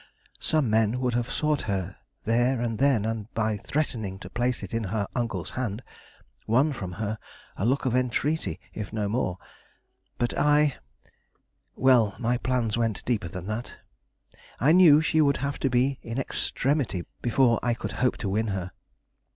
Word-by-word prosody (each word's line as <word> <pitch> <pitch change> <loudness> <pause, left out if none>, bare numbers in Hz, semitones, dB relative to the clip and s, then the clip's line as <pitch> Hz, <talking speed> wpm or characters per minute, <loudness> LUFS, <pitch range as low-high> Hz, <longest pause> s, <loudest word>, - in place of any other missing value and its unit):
Some 155 -5 +2
men 110 +2 +2
would 125 -1 0
have 120 0 -1
sought 150 -2 +1
her 95 -2 -2 0.3
there 120 +3 +2
and 115 -2 -2
then 135 -6 +3
and, 110 -1 -3
by 110 -1 0
threatening 110 -7 -2
to - - -10
place 120 0 -1
it - - -7
in 115 -1 -1
her 100 +1 -2
uncle's 115 -8 -2
hand, 120 -2 -3 0.6
won 135 +7 +3
from 95 -8 -6
her 110 +2 -3 0.4
a 100 - -1
look 135 +2 +1
of 125 -2 +1
entreaty, 125 - 0
if 105 -2 -5
no 105 -2 -1
more; 100 -4 -1 0.8
but 120 - -1
I 150 -1 +3 1.0
well, 120 -6 +4
my 120 +1 0
plans 120 -4 0
went 115 -3 -1
deeper 110 -7 0
than 90 +2 -7
that. 110 +4 -5 0.8
I 140 +5 +4
knew 165 -4 +7
she 160 0 +2
would 140 -2 +3
have 140 +1 -3
to 135 - +1
be 130 +2 +1
in 115 +2 -5
extremity 135 - -1 0.2
before 120 -1 +3
I 120 -1 +1
could - - -5
hope 125 - +2
to - - 0
win 110 +3 0
her. 95 -2 -3
120 Hz, 165 wpm, -26 LUFS, 105-130 Hz, 1.0 s, knew